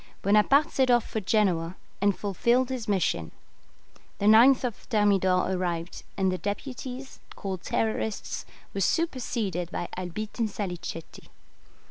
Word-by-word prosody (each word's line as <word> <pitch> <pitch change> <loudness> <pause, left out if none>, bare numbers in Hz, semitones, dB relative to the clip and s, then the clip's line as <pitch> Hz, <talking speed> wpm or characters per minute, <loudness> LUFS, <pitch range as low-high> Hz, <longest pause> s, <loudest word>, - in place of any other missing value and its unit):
Bonaparte 215 +9 +4
set 260 -1 +2
off 240 -2 +4
for 220 - -2
Genoa, 185 -5 +1 0.3
and 200 -1 +2
fulfilled 235 +6 +1
his 255 -4 -4
mission. 165 - 0 0.9
The 200 - -2
9th 240 +3 +6
Thermidor 195 -5 +2
arrived, 175 -2 -2 0.2
and 190 -1 +2
the 185 - -3
deputies, 255 +5 -5 0.2
called 190 -3 -4
Terrorists, 220 -1 -2 0.3
were 195 - -2
superseded 225 - -1
by 175 - -4
Albitte 185 +6 -5
and 225 -2 +1
Salicetti. 180 -5 -6
205 Hz, 120 wpm, -27 LUFS, 185-240 Hz, 0.9 s, 9th